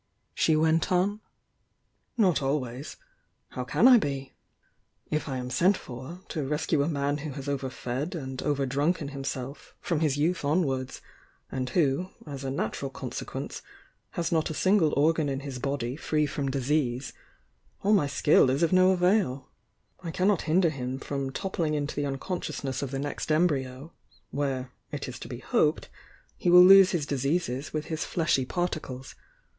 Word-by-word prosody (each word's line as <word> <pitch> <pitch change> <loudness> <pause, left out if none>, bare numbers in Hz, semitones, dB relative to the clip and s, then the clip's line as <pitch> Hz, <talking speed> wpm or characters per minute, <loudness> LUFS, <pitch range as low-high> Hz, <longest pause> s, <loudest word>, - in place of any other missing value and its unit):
she 160 - +3
wCi 160 +1 +3
t 185 - 0
on. 200 +4 +1 1.0
"Not 185 -10 +3
always. 135 -1 -3 0.5
How - - -4
can - - +4
I 250 -2 +8
be? 135 -6 -4 0.8
If 155 -1 -1
I 130 - -2
am 125 0 -5
sent 185 +9 +3
for 130 +8 -9
to 155 - -2
rescue 150 +2 0
a 140 - +1
man 145 -2 -1
who 150 -1 -5
has 135 +1 -7
overfed 135 +2 -3
and 130 -5 -5
over 140 -2 0
drunken 145 +3 0
himself 135 -1 -6
from 170 -5 -1
his 150 -3 +1
youth 165 +4 +1
onwards, 140 -4 0 0.5
and 130 -1 -2
who, 165 +2 +1 0.2
as 140 -3 -7
a 135 - -2
nat 130 -5 -2
ural 135 - -3
consequence, - - -6 0.6
has 170 -1 -1
not 160 -2 +1
a 155 - -4
single 185 -4 +3
organ 155 0 +3
in 135 0 -2
his 135 -3 -6
body 135 -2 -2
free 150 0 0
from 140 -1 -2
disease, 135 -1 -1 0.7
all 205 +2 +4
my 185 -9 +4
skill 140 -1 +4
is 135 +6 +1
of 170 - +2
no 185 0 +6
avail 180 -7 +2 0.3
— - - -45
I 170 - -4
can 185 +3 0
not 205 -5 +3
hinder 170 0 +4
him 130 -2 -4
from 140 0 -3
toppling 165 0 -2
into 145 0 -2
the 145 0 -1
unconscious 155 +2 -4
ness 135 -1 -2
of 140 - -3
the 135 - -3
next 145 +2 -3
embryo, 145 -2 0 0.4
where, 135 -3 -2 0.2
it - - -4
is - - -7
to - - -8
be - - -6
hoped, - - +1 0.5
he - - 0
will 180 +1 +9
lose 195 0 +9
his 165 -5 -1
diseases 140 0 -1
with 155 -1 -3
his 160 -1 -3
fleshy 155 -6 +1
particles. 155 -6 -4
145 Hz, 175 wpm, -28 LUFS, 135-170 Hz, 1.0 s, will